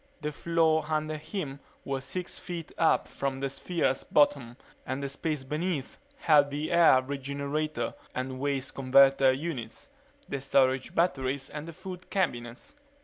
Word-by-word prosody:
The 150 0 -2
floor 160 0 +2
under 155 0 -1
him 150 -4 -5 0.3
was 135 -1 -3
six 180 +3 -4
feet 170 -3 -6
up 165 - +3
from 135 -1 -3
the 135 0 -2
sphere's 135 -1 -1
bottom 135 -5 +2 0.3
and 130 +2 -4
the - - -1
space 150 +1 -3
beneath 150 +1 -3 0.2
held 150 - +5
the 145 +2 -3
air 165 -7 +6
regenerator 140 +3 -3 0.2
and 130 0 -3
waste 140 -1 -1
converter 135 0 +5
units, 130 -5 -5 0.4
the 140 - -4
storage 130 -1 +2
batteries 135 -5 0
and 150 +2 -6
the 165 - -7
food 185 +1 -9
cabinets. 135 - -2
140 Hz, 145 wpm, -29 LUFS, 135-160 Hz, 0.4 s, air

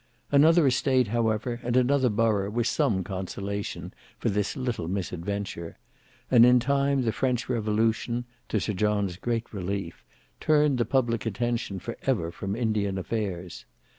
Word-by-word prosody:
Another 155 +3 +6
estate 130 -2 +2
however 115 +1 0
and 120 0 0
another 130 0 +3
borough 105 -2 +1
were 120 +3 0
some 100 -4 +1
consolation 100 +2 -5 0.2
for - - -1
this 105 +5 -1
little 125 -10 -2
misadventure; 90 -1 -4 0.5
and 120 -2 +8
in 125 +1 +7
time 140 +1 +1
the 115 - +1
French 125 0 -1
Revolution, 115 +1 0 0.2
to 110 - +1
Sir 105 +3 -2
John's 100 -2 0
great 115 +2 -3
relief, 95 -2 -4 0.4
turned 150 -4 +3
the 120 - +2
public 115 -3 0
attention 115 -1 -2
for 115 +5 -6
ever 95 -11 0
from 95 +3 -4
Indian 110 -4 0
affairs. 95 -3 -4
110 Hz, 140 wpm, -27 LUFS, 100-125 Hz, 0.5 s, and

